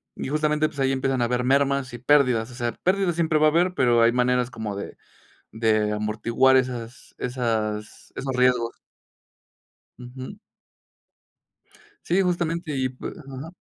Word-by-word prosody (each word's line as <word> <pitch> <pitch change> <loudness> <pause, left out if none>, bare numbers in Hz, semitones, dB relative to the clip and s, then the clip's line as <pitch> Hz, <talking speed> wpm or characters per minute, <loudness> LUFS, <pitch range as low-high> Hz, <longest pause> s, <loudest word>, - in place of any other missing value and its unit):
y - - -5
justamente 150 +1 +1
pues, 145 - -11
ahí 135 0 +2
empiezan 135 -1 0
a - - +3
haber 125 +1 0
mermas 140 0 +1
y 120 - -5
pérdidas. 125 -3 +2
O - - -11
sea, 120 -2 -2
pérdidas 185 -2 +1
siempre 160 -2 +1
va 155 - +5
a - - +6
haber, 175 +3 +2
pero 120 -5 +3
hay 115 +1 +5
maneras 125 0 +1
como 110 -3 -5
de 100 - -7 0.6
de 110 -2 +2
amortiguar 110 +5 +2
esas 125 -2 -4
esas 110 -4 -3
esos 135 -1 -3
riesgos. 125 -2 +2 1.2
Uju. 130 +9 -9 1.7
Sí, 180 +3 +2
justamente 170 -3 -1
y, 130 -1 0
pues 130 - -8
ajá. 140 0 -9
130 Hz, 150 wpm, -24 LUFS, 120-150 Hz, 1.7 s, a